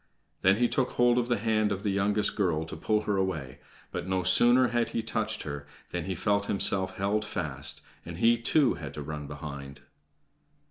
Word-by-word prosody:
Then 95 +1 +5
he 120 +3 +2
took 130 +1 0
hold 120 0 +4
of 120 - -1
the 120 -1 +1
hand 110 0 +1
of 100 0 -3
the 105 - +1
youngest 100 +2 +1
girl 85 -6 0
to 80 - -7
pull 105 +6 0
her 105 -2 0
away; 80 -9 -2 0.3
but - - -4
no 95 0 0
sooner 120 +8 +5
had 120 -1 0
he 115 - -2
touched 110 0 -2
her 70 -1 -6 0.2
than 90 -2 -3
he 95 0 -3
felt 100 +3 0
himself 95 -1 +1
held 100 +2 0
fast, 105 - -4 0.2
and - - -8
he, 115 +1 +5
too, 125 +4 +2
had - - -8
to 75 - -5
run 75 0 -6
behind. 70 -2 -8
100 Hz, 195 wpm, -28 LUFS, 85-110 Hz, 0.3 s, Then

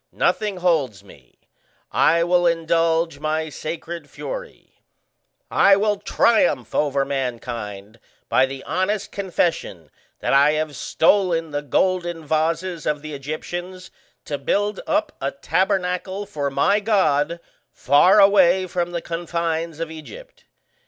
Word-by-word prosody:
Nothing 210 -3 0
holds 150 - 0
me; 70 -10 -19 0.5
I 170 +1 +3
will 175 0 +3
indulge 165 -1 +1
my 155 +1 -2
sacred 160 0 -6
fury; - - -8 0.7
I 195 0 +6
will 205 +1 +1
triumph 265 +7 +1
over 140 -2 +1
mankind 115 -6 -5 0.3
by 130 - +3
the 135 0 -8
honest 205 +2 -2
confession 170 - -2 0.3
that - - -1
I 140 +2 +5
have 155 -1 -2
stolen 165 +1 +1
the 145 0 -2
golden 175 +3 -1
vases 165 +2 -1
of 150 -1 -1
the 155 -1 -7
Egyptians 175 +6 -6 0.3
to 145 -2 -4
build 205 +8 0
up 310 0 0
a 135 - 0
tabernacle 185 +5 -1
for 145 -8 -3
my 140 +10 +2
God 170 -7 +1 0.3
far 145 +9 +4
away 190 -2 +5
from 175 -1 -3
the 170 - -3
confines 165 -1 -3
of 165 -1 -4
Egypt. 445 - -12
165 Hz, 125 wpm, -22 LUFS, 145-185 Hz, 0.7 s, I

